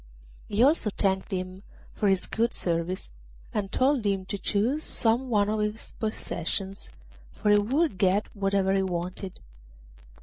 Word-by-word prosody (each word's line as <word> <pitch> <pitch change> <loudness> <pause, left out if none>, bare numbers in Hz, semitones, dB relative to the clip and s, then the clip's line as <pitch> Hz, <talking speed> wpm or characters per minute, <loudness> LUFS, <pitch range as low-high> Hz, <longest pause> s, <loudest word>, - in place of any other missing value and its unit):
He 210 +4 +3
also 275 -5 +4
thanked 190 -1 +1
him 185 0 -4 0.3
for 210 - 0
his 190 -2 +3
good 230 +1 0
service, 170 - -2 0.4
and 200 -2 -2
told 265 -1 +2
him 195 -2 0
to 200 - -4
choose 230 +11 +1
some 245 -2 +1
one 205 -3 +3
of 215 +1 0
his 210 +1 -3
possessions, 195 -2 -3 0.4
for 210 - +1
he 205 - +6
would 265 - +1
get 195 +1 +3
whatever 195 -1 +1
he 195 - +3
wanted. 185 +1 -4
200 Hz, 145 wpm, -27 LUFS, 190-220 Hz, 0.4 s, he